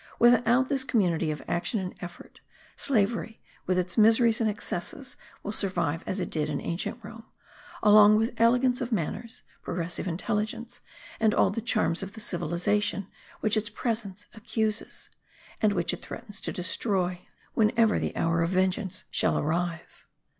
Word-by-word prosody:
Without 245 +2 +5
this 270 -2 +1
community 180 -11 +1
of 150 -1 -4
action 175 +7 0
and 185 -1 -4
effort 175 -1 -10 0.4
slavery, 225 -2 0 0.3
with 185 0 +2
its 180 +4 0
miseries 225 +1 +5
and 220 - +3
excesses, 225 +5 -2 0.3
will 205 - -3
survive 175 -6 -1
as 190 - -1
it 180 - -3
did 155 -1 -1
in 145 - -2
ancient 170 +7 -3
Rome,* 225 +2 -10 0.6
along 210 0 +8
with 225 +2 +1
elegance 245 +2 +4
of 250 -1 -3
manners, 225 +4 -3 0.2
progressive 175 +2 -3
intelligence, 210 +7 -3 0.4
and 220 -1 +3
all - - +4
the 230 - -3
charms 215 -6 +1
of 195 0 -6
the 220 - -9
civilization 200 +2 -1 0.3
which 215 0 +2
its 215 0 0
presence 210 -3 -3
accuses, 220 -1 -2 0.5
and 215 - +4
which 175 -3 0
it - - -6
threatens 215 -4 -6
to - - -3
destroy, 180 0 -1 0.3
whenever 225 0 +3
the - - -3
hour 165 0 +1
of 165 - +1
vengeance 185 0 0
shall - - +2
arrive. 165 +2 -3
210 Hz, 155 wpm, -27 LUFS, 180-225 Hz, 0.6 s, along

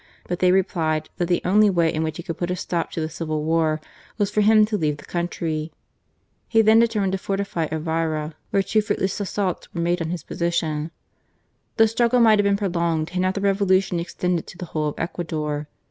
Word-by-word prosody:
But 175 0 -3
they 180 -1 +4
replied 160 -5 0
that 175 -2 0
the 175 0 +1
only 210 +3 +5
way 170 -4 +2
in 155 - -1
which 160 -1 -2
he 175 - -6
could 165 - -6
put 175 - -1
a 180 - 0
stop 170 -1 -2
to 165 - -4
the 155 - -1
Civil 155 -1 -3
War 160 -1 +1 0.4
was 205 -2 0
for 210 - +2
him 215 0 +6
to 215 0 -2
leave 150 -6 0
the - - -13
country. 165 -2 -3 0.8
He 225 -1 +4
then 220 +1 +6
determined 215 -5 +2
to 190 - -1
fortify 195 -5 -2
Elvira, 160 -1 -2 0.2
where 195 - +2
two 215 +2 +2
fruitless 195 -2 -1
assaults 195 -2 -2
were 170 - -1
made 175 +1 0
on 160 - -2
his 170 -3 -4
position. 165 -3 -1 0.9
The 225 -1 +6
struggle 235 +2 +2
might 220 -3 +6
have 205 - +3
been 200 0 +3
pro 200 -1 -1
longed 170 -2 -1
had 180 0 -1
not 185 +1 +1
the 200 - -2
Revolution 195 -2 +2
extended 175 0 -2
to - - -11
the 180 - -6
whole 155 -1 0
of 150 - -3
Ecuador. 155 -3 -3
175 Hz, 215 wpm, -23 LUFS, 160-200 Hz, 0.9 s, him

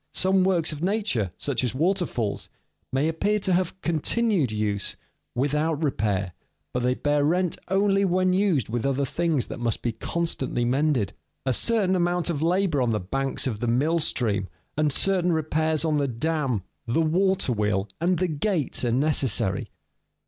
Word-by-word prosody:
Some 190 0 +3
works 175 -4 +2
of 150 -1 -6
nature, 185 - 0
such 140 -3 -2
as 125 0 -1
waterfalls, 160 - -1 0.4
may 135 +4 +1
appear 205 +6 +1
to 190 -2 0
have 180 -1 +2
a - - -18
continued 170 - +1
use 105 -2 -2 0.4
without 150 +4 0
repair, 100 - 0 0.4
but 125 - -1
they 125 +1 +1
bear 145 +1 +1
rent 175 +3 +1
only 195 +1 +2
when 185 0 +2
used 185 - +2
with 115 +1 -2
other 140 0 +1
things 160 -2 0
that - - -7
must 115 -2 -2
be 120 - 0
constantly 130 -1 -2
mended. 130 - +1 0.3
A 130 - +2
certain 205 - +2
amount 175 -1 +1
of 150 -3 -3
labor 170 -3 +2
on 125 - +1
the 110 -2 0
banks 135 +9 -2
of 115 -6 -2
the 120 - -2
mill 145 +8 +2
stream, 105 -10 0 0.3
and 150 0 +1
certain 180 +2 +2
repairs 160 0 0
on 155 -2 +1
the 140 -1 +1
dam, 130 - -1 0.2
the 120 +8 +2
water 180 -3 +2
wheel, 105 -2 0
and 175 +2 +2
the 185 - +1
gates 160 -2 -1
are 120 - +1
necessary. 130 -8 +1
150 Hz, 170 wpm, -25 LUFS, 125-180 Hz, 0.4 s, Some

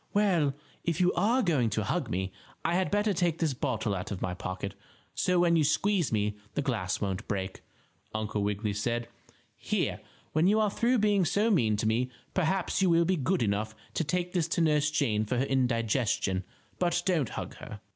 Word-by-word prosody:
"Well, 175 -9 +3 0.3
if 170 -2 -1
you 180 0 +3
are 235 +7 +2
going 145 - +2
to 110 0 -1
hug 95 - -1
me 95 +2 -2 0.3
I 165 - +2
had 185 +1 +1
better 205 0 +2
take 175 -3 +1
this 160 -4 0
bottle 120 -6 -1
out 90 -1 -4
of 100 - -4
my 90 - -2
pocket, 95 +1 -5 0.4
so 180 -1 +1
when 170 -1 +4
you 160 - +4
squeeze 175 - +2
me 105 -1 0 0.2
the 145 - 0
glass 110 -9 -1
won't 95 -3 -3
break," 95 -2 -3 0.5
Uncle 110 -1 -2
Wiggily 105 +1 -1
said. 120 +3 -1 0.5
"Here, - - -1 0.3
when 155 +3 +3
you 210 +2 +4
are 210 -2 +2
through 240 +4 +2
being 205 -3 +3
so 210 +6 +2
mean 110 - +3
to 110 - -1
me 115 +4 +1 0.2
perhaps 185 +2 0
you 190 - +4
will 170 0 +4
be 185 +2 +2
good 175 +1 +1
enough 110 +1 -1 0.2
to - - 0
take 180 +3 -1
this 175 -3 +1
to 170 - 0
Nurse 155 -2 +3
Jane 135 -9 +1
for 120 +4 -2
her 130 - +2
indigestion, 115 -7 +1 0.3
but 175 -1 +1
don't 165 - +1
hug - - -6
her." - - -9
145 Hz, 195 wpm, -29 LUFS, 110-180 Hz, 0.5 s, when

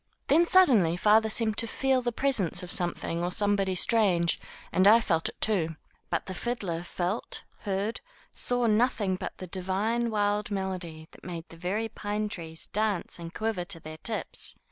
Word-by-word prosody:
Then 330 +4 +5
suddenly 245 - +5
father 215 +3 +4
seemed 220 -1 +2
to 230 - +1
feel 265 +2 +1
the 240 -1 -1
presence 230 - +1
of 175 - -5
some 175 -1 +2
thing 170 +1 -4
or 175 - -1
somebody 200 -2 +2
strange, 180 -5 +3 0.3
and 185 +3 +4
I 220 +3 +8
felt 165 -8 0
it, - - -14
too. 170 -7 +1 0.3
But 170 - -1
the 190 - -6
fiddler 190 -6 -3
felt, 180 +4 -4 0.2
heard, 205 +3 -3 0.3
saw 245 -1 +1
nothing 215 -3 +2
but - - -6
the 185 - -7
divine, 195 +6 -1
wild 210 -1 0
melody 185 -5 -4
that - - -18
made 170 -2 -7
the - - -12
very 190 +7 -2
pine 210 -1 -3
trees 160 -4 -7
dance 210 -5 -1
and 165 -1 -7
quiver 215 -2 -2
to 175 -2 +2
their 155 0 -9
tips. 220 +6 -1
200 Hz, 175 wpm, -28 LUFS, 175-220 Hz, 0.3 s, I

